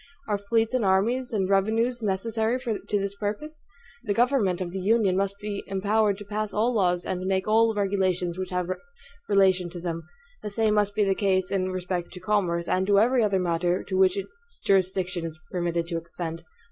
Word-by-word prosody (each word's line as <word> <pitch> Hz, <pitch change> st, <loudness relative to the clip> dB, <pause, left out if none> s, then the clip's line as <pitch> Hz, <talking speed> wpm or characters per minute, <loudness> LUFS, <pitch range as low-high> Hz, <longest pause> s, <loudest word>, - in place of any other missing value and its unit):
Are 205 Hz, -2 st, 0 dB
fleets 225 Hz, +3 st, 0 dB
and 255 Hz, -3 st, +1 dB
armies 230 Hz, +7 st, +2 dB
and 195 Hz, -4 st, 0 dB
revenues 225 Hz, +5 st, +1 dB
necessary 220 Hz, +4 st, 0 dB
to 220 Hz, -4 st, -2 dB
this 200 Hz, 0 st, -2 dB
purpose? 215 Hz, +10 st, -5 dB, 0.4 s
The 205 Hz, -3 st, -1 dB
government 235 Hz, -7 st, +2 dB
of 180 Hz, -2 st, -3 dB
the 190 Hz, -, -4 dB
Union 200 Hz, -1 st, +2 dB
must 195 Hz, +1 st, 0 dB
be 205 Hz, -1 st, -4 dB
empowered 205 Hz, +1 st, +1 dB
to 205 Hz, -, -9 dB
pass 210 Hz, +1 st, -3 dB
all 230 Hz, +4 st, +2 dB
laws, 180 Hz, -5 st, +1 dB
and 180 Hz, -, -2 dB
to 185 Hz, -, -3 dB
make 190 Hz, 0 st, 0 dB
all 225 Hz, +1 st, +4 dB
regulations 190 Hz, -3 st, 0 dB
which 185 Hz, 0 st, -4 dB
have 180 Hz, -1 st, -2 dB, 0.6 s
relation 190 Hz, -2 st, +3 dB
to 175 Hz, +1 st, -8 dB
them. 165 Hz, -1 st, -3 dB, 0.4 s
The 210 Hz, -, -4 dB
same 215 Hz, +1 st, +1 dB
must 205 Hz, -1 st, +1 dB
be 210 Hz, -, +3 dB
the 195 Hz, -1 st, +2 dB
case 190 Hz, -2 st, +1 dB
in 185 Hz, -1 st, 0 dB
respect 180 Hz, -1 st, -3 dB
to 180 Hz, -, -8 dB
commerce, 180 Hz, -3 st, 0 dB
and 185 Hz, +1 st, +1 dB
to 200 Hz, -1 st, +5 dB
every 245 Hz, +3 st, +3 dB
other 200 Hz, -2 st, +2 dB
matter 175 Hz, +1 st, 0 dB
to 190 Hz, -, -4 dB
which 190 Hz, 0 st, +4 dB
its 470 Hz, -, -9 dB
jurisdiction 185 Hz, -2 st, +1 dB
is 160 Hz, -1 st, -6 dB
permitted 170 Hz, -2 st, -1 dB
to 170 Hz, -, -1 dB
extend. 165 Hz, 0 st, -7 dB
195 Hz, 195 wpm, -26 LUFS, 185-215 Hz, 0.6 s, to